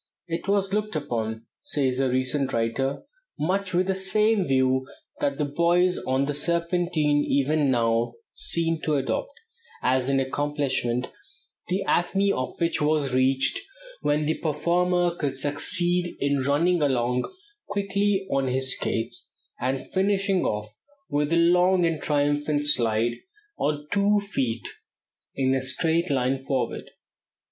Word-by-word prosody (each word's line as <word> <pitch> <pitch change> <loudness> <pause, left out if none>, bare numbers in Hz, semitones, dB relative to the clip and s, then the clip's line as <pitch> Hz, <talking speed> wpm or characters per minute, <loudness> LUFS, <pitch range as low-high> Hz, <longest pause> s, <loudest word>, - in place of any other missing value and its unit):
"It 170 +2 -4
was 195 -1 +1
looked 210 -2 -1
upon," 115 -6 -3 0.2
says 135 - 0
a 135 -1 +2
recent 130 +2 0
writer, 115 +4 -1 0.3
"much 185 +4 -1
with 180 +1 +2
the 190 - +1
same 210 +2 +2
view 130 0 +2 0.3
that 140 -1 0
the 150 - 0
boys 170 +5 +2
on 130 +1 +2
the 145 - -2
Serpentine 170 -1 +1
even 145 +1 +2
now 115 -1 +1 0.2
seem 165 -1 -2
to 155 - 0
adopt, 465 - -2 0.4
as 130 0 +2
an 135 0 +2
accomplishment, 135 -3 -1 0.6
the 185 +2 0
acme 195 +3 +2
of 130 -6 -3
which 170 -2 0
was 150 -3 +1
reached 135 - +2 0.4
when 150 +1 +1
the 155 - -1
performer 175 +3 +1
could 140 -5 -3
succeed 175 +5 0
in 140 0 +1
running 160 +6 +2
along 125 -3 0 0.4
quickly 200 -1 0
on 135 -1 +1
his 130 +1 +1
skates, 115 0 -3 0.3
and 130 +2 -3
finishing 195 -1 +1
off 105 0 -3 0.4
with 145 +1 0
a - - +3
long 180 +1 +4
and 165 -2 -1
triumphant 145 0 +1
slide 120 -4 +1 0.4
on 150 0 -1
two 205 +1 +3
feet 130 - -2 0.7
in 130 -1 +1
a 135 - +1
straight 160 +7 +1
line 135 -1 +1
forward. 135 -1 -2
145 Hz, 135 wpm, -25 LUFS, 130-175 Hz, 0.7 s, long